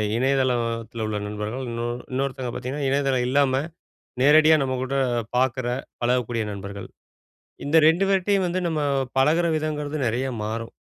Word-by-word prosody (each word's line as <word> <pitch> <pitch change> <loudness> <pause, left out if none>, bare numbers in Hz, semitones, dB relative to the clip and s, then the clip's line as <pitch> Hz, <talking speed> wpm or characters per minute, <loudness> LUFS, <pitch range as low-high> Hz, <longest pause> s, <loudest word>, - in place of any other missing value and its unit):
இணையதளத்துல 130 +1 +2 0.3
த்துல 115 -2 -5
உள்ள 105 - -2
நண்பர்கள். 105 +5 -4
இன்னோ 115 0 -3 0.3
இன்னொருத்தவுங்க 130 -2 -2
பாத்தீங்கன்னா, 135 +3 -3
இணையதளம் 135 -2 +1
இல்லாம 135 0 +2 0.6
நேரடியா 155 +2 +6
நம்ம 130 -1 -1
கூட 130 +1 -3 0.4
பாக்குற, 130 0 +1 0.4
பழகக்கூடிய 120 -2 0
நண்பர்கள். 100 0 -7 0.8
இந்த 150 +3 +3
ரெண்டு 165 +4 +4
பேர்ட்டேயும் 195 0 +2
வந்து, 180 +1 -1
நம்ம 160 -2 -1 0.4
பழகுற 160 +6 +3
விதங்குறது 150 -1 -3
நெறய 125 +4 -1 0.2
மாறும். 115 +1 -4
130 Hz, 130 wpm, -24 LUFS, 120-150 Hz, 0.8 s, நேரடியா